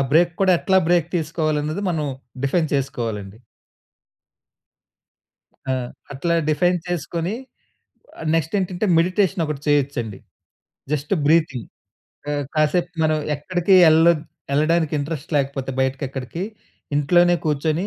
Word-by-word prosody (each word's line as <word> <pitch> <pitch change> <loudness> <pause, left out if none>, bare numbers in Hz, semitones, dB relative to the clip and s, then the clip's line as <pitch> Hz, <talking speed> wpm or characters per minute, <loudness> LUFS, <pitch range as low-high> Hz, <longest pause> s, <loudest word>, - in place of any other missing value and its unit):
Break 170 +1 +4
కూడా 190 -1 +5
ఎట్లా 190 -2 +3
break 175 -2 +3
తీసుకోవాలి 155 -1 -1
అన్నది, 155 +7 -3
మనం 155 -3 -1 0.4
డిఫైన్ 155 +3 +1
చేసుకోవాలండి. 115 -7 -3 2.3
ఆ! - - +2 0.4
అట్లా 170 +5 -1 0.2
డిఫైన్ 175 +3 +2
చేసుకొని, 170 +3 -2 1.0
నెక్స్ట్ 165 +3 0
ఏంటంటే, 185 +2 -1
మెడిటేషన్ 185 0 +2
ఒకటి 150 -2 -4
చేయొచ్చండి. 135 -8 0 0.7
Just 150 +3 -1
breathing. 155 -6 +2 0.6
ఆ! - - 0 0.2
కాసేపు 170 +4 +2
మనం 155 0 +2 0.2
ఎక్కడికి 175 +5 +1 0.2
ఏళ్ళోద్ 160 0 +5 0.3
ఏళ్ళడానికి 155 +2 +2
ఇంట్రెస్ట్ 150 +1 -5
లేకపోతే 135 -1 -1
బయటకెక్కడికి, 135 +4 -3 0.5
ఇంట్లోనే 175 +4 +4
కూర్చొని 155 +4 0
155 Hz, 105 wpm, -22 LUFS, 140-175 Hz, 2.3 s, కూడా